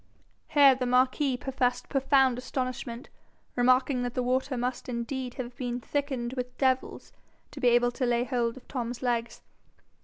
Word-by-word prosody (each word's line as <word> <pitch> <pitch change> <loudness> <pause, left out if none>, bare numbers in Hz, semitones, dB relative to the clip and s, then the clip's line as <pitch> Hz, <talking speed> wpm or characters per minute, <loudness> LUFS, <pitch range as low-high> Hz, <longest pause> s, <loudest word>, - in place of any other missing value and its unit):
Here 285 -2 +6
the 255 -1 -2
marquis 255 +2 +2
professed 250 -1 -1
profound 270 -2 +3
astonishment, 255 0 -4 0.5
remarking 255 +1 +3
that 245 0 -3
the 250 - 0
water 255 +1 0
must 250 +1 -3
indeed 245 +1 -4
have 245 -2 -6
been 245 -1 -3
thickened 260 -2 -3
with 250 -1 -5
devils 260 -1 0 0.4
to 290 - -9
be 250 - +2
able 240 0 +4
to 250 +1 -2
lay 240 0 +2
hold 240 -2 -1
of 260 - -14
Tom's 245 -2 -4
legs. 235 -1 -2
250 Hz, 155 wpm, -28 LUFS, 245-265 Hz, 0.5 s, Here